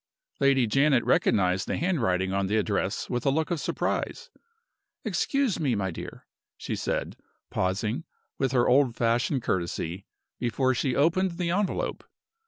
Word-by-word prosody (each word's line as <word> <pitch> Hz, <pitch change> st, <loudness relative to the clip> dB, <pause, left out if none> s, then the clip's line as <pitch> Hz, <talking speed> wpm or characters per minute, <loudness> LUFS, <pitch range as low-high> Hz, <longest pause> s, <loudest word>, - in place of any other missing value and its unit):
Lady 135 Hz, -2 st, +4 dB
Janet 135 Hz, +2 st, +3 dB
recognized 90 Hz, -1 st, +2 dB
the -, -, -1 dB
handwriting 95 Hz, -, 0 dB
on 100 Hz, 0 st, 0 dB
the 105 Hz, +3 st, +1 dB
address 100 Hz, -2 st, -1 dB
with 120 Hz, -1 st, -2 dB
a 140 Hz, -, +3 dB
look 160 Hz, +5 st, 0 dB
of 170 Hz, -, 0 dB
surprise. 475 Hz, -, -2 dB, 0.7 s
"Excuse 275 Hz, -9 st, 0 dB
me, 135 Hz, -7 st, +1 dB
my 95 Hz, -2 st, -1 dB
dear," -, -, -8 dB, 0.3 s
she -, -, -4 dB
said, -, -, -2 dB, 0.4 s
pausing, 105 Hz, -, -1 dB, 0.3 s
with 135 Hz, -2 st, +1 dB
her 125 Hz, -2 st, +3 dB
old 130 Hz, -2 st, +4 dB
fashioned 120 Hz, +2 st, +1 dB
courtesy, 85 Hz, +1 st, -2 dB, 0.3 s
before 130 Hz, +2 st, +1 dB
she 125 Hz, +1 st, 0 dB
opened 170 Hz, +5 st, +2 dB
the 175 Hz, -2 st, -1 dB
envelope. 200 Hz, +2 st, -1 dB
125 Hz, 145 wpm, -27 LUFS, 100-150 Hz, 0.7 s, Lady